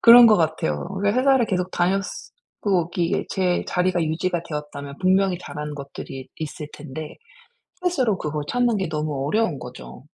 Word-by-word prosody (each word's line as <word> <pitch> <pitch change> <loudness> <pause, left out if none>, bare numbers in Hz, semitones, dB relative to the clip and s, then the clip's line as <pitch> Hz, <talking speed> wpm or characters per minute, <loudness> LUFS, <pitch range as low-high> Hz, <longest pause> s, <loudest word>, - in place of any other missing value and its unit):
그런 240 +1 +10
것 215 -2 +7
같아요. 115 - 0
그러니까 205 +4 +2
회사를 265 -3 +4
계속 180 -1 -1
다녔으 190 +2 -1 0.3
고 180 -5 +1
이게 170 -1 0
제 180 -2 +1
자리가 180 -1 +1
유지가 165 +2 -1
되었다면 150 -3 -6
분명히 190 0 +3
잘하는 150 -4 -6
것들이 140 -1 -8
있을 155 -1 -5
텐데 150 +1 -8 0.7
스스로 260 - +2
그걸 150 -1 -3
찾는 245 -3 +2
게 190 - -1
너무 150 -3 -2
어려운 200 -6 +1
거죠. 125 +2 -10
175 Hz, 355 characters per minute, -23 LUFS, 150-195 Hz, 0.7 s, 그런